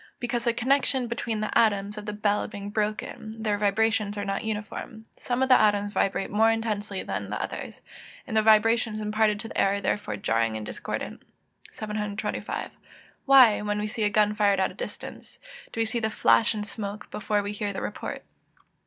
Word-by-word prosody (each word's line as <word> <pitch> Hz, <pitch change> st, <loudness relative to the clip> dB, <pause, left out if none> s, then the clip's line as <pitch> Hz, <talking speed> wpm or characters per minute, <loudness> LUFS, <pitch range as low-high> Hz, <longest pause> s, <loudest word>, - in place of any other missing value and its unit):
_ -, -, -22 dB, 0.2 s
Because 240 Hz, -1 st, -2 dB
the 235 Hz, -, +4 dB
connection 260 Hz, +2 st, +1 dB
between 230 Hz, -2 st, -3 dB
the 215 Hz, -, -3 dB
atoms 205 Hz, -2 st, +3 dB
of 210 Hz, 0 st, -8 dB
the -, -, -1 dB
bell 210 Hz, 0 st, 0 dB
being 200 Hz, 0 st, -7 dB
broken, 215 Hz, +1 st, -3 dB
their 210 Hz, -2 st, 0 dB
vibrations 210 Hz, 0 st, +1 dB
are 205 Hz, -, -2 dB
not 195 Hz, 0 st, -2 dB
uniform: 220 Hz, +1 st, -5 dB
some 245 Hz, +1 st, -1 dB
of 265 Hz, -, 0 dB
the 255 Hz, -, +7 dB
atoms 205 Hz, -1 st, +2 dB
vibrate 195 Hz, 0 st, 0 dB
more 220 Hz, +2 st, +4 dB
intensely 210 Hz, -3 st, -2 dB
than -, -, -4 dB
the -, -, -3 dB
others; -, -, -6 dB, 0.4 s
the 220 Hz, -3 st, +1 dB
vibrations 220 Hz, +1 st, +4 dB
imparted 215 Hz, 0 st, +1 dB
to 225 Hz, -, -6 dB
the -, -, 0 dB
air 195 Hz, 0 st, +3 dB
are -, -, -2 dB
therefore 190 Hz, -, -1 dB
jarring 115 Hz, +2 st, 0 dB
and 110 Hz, -, -6 dB
discordant. -, -, -5 dB, 0.5 s
725. 210 Hz, -1 st, -4 dB, 0.6 s
_Why, 250 Hz, -6 st, +7 dB
when 210 Hz, 0 st, -1 dB
we 210 Hz, -, -1 dB
see 215 Hz, +1 st, -4 dB
a 210 Hz, -, +3 dB
gun 210 Hz, 0 st, +3 dB
fired 205 Hz, -2 st, +3 dB
at 190 Hz, -, +1 dB
a -, -, -12 dB
distance, -, -, -8 dB, 0.3 s
do -, -, -6 dB
we 225 Hz, -, +3 dB
see 225 Hz, +2 st, -1 dB
the 220 Hz, -1 st, 0 dB
flash 220 Hz, 0 st, +3 dB
and 210 Hz, -1 st, -3 dB
smoke, 210 Hz, -2 st, -6 dB
before 205 Hz, 0 st, -1 dB
we 205 Hz, -, -3 dB
hear 205 Hz, 0 st, -3 dB
the 195 Hz, -, -4 dB
report? 210 Hz, -, -5 dB
210 Hz, 195 wpm, -26 LUFS, 205-225 Hz, 0.6 s, the